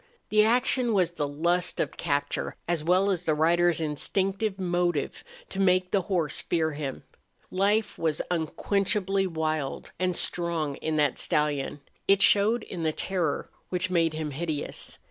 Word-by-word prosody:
The 215 0 +5
action 245 0 +2
was 180 -3 +2
the 150 -4 -2
lust 170 +5 0
of - - -1
capture 145 -3 -2
as 170 -3 0
well 185 +4 +3
as 180 -2 -2
the 155 - +2
rider's 170 +1 +3
instinctive 190 +6 -1
motive 175 -4 -1 0.3
to 195 - -5
make 185 -1 +3
the 200 - +3
horse 170 -5 -1
fear 160 -2 0
him. 145 -3 -5 0.5
Life 205 +3 +1
was 160 -2 0
unquenchably 195 +3 0
wild 155 -4 -2
and 180 -1 0
strong 165 -6 -1
in 160 0 -2
that 150 -3 +2
stallion; 145 -1 0 0.3
it 195 0 +5
showed 215 +3 +4
in 180 - -6
the 160 -1 +1
terror 175 -2 -2 0.2
which 180 0 -1
made 165 -3 +2
him 155 -1 -3
hideous. 150 0 -3
175 Hz, 150 wpm, -27 LUFS, 155-195 Hz, 0.5 s, The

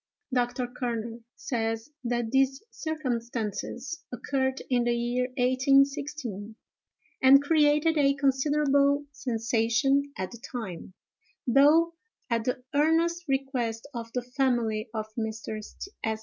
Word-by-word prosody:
Dr. 245 0 0
Kerner 235 -2 -4 0.2
says 225 +1 -3
that 240 -2 -1
these 270 +2 +2
circumstances 250 - -4
occurred 265 +1 -1
in 245 -2 +1
the 240 0 +2
year 240 +1 0
1816, 265 -4 +1 0.7
and 275 +1 +7
created 300 +1 +3
a 275 -1 +4
considerable 280 +1 +2
sensation 245 +3 +1
at 185 - -3
the 235 - -10
time, 190 -7 -6 0.5
though, 300 +7 +5 0.4
at 230 -1 +1
the 250 0 -2
earnest 330 +4 +2
request 265 -4 -1
of 230 -1 -6
the 250 - -1
family 240 -4 0
of 220 -1 -3
Mr. 220 -1 -4
St. 220 - -5
255 Hz, 110 wpm, -28 LUFS, 230-280 Hz, 0.7 s, and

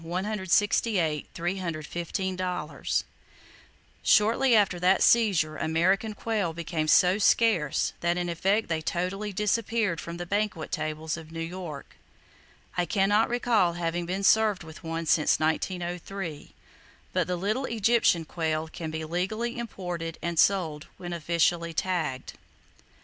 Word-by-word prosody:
[Page 190 +3 -3
69] 185 -7 +2 2.7
Shortly 230 +4 +4
after 200 -4 +3
that 185 +2 +4
seizure 185 -10 +3
American 185 +7 +1
quail 205 -7 -1
became 165 -1 -3
so 180 +5 +5
scarce 205 -9 +2
that 175 0 0
in 175 0 -1
effect 190 +6 +1
they 160 -1 -1
totally 185 +6 -2
disappeared 210 -2 0
from 170 0 -7
the 175 - -5
banquet 200 -4 -2
tables 155 +1 -3
of 160 -1 -11
New 165 - -6
York. 165 -3 -7 0.8
I 180 -1 0
can 195 +2 +2
not 210 +2 +3
recall 235 -7 +2
having 170 0 -2
been 190 +2 -2
served 215 -3 +4
with 160 +3 -12
one 165 0 -3
since 155 -1 +3
1903, 175 0 -3 0.6
but - - +1
the 180 - -1
little 215 +9 -1
Egyptian 225 -7 +2
quail 160 -1 -2
can 160 0 -6
be 160 0 -4
legally 215 +9 -2
imported 175 -7 -5
and 170 -1 -1
sold 165 -6 +2
when 175 -1 -6
officially 170 0 0
tagged. 160 -8 -2
175 Hz, 130 wpm, -27 LUFS, 165-205 Hz, 2.7 s, so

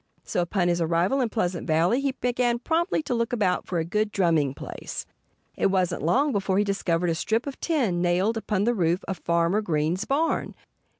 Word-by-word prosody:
So - - -1
upon 175 +1 0
his 175 0 +1
arrival 170 +11 +1
in 240 - 0
Pleasant 180 -6 -2
Valley 170 +11 +2
he 275 -1 0
began 245 -1 0
promptly 325 +6 0
to 265 - -2
look 230 0 -1
about 200 -7 0
for 180 - -2
a 165 - 0
good 210 +5 0
drumming 160 -8 +1
place. - - -7 0.5
It - - +2
wasn't 185 -2 0
long 265 - +2
before 195 -3 0
he 205 - +4
discovered 180 -4 0
a - - +1
strip 220 +8 -1
of 280 -2 -6
tin 240 - 0
nailed 180 +5 +2
upon 210 -3 -1
the 240 +3 +2
roof 175 -3 0
of 190 - -4
Farmer 170 +4 +1
Green's 170 +1 -1
barn. 300 +6 0
195 Hz, 195 wpm, -25 LUFS, 175-235 Hz, 0.5 s, he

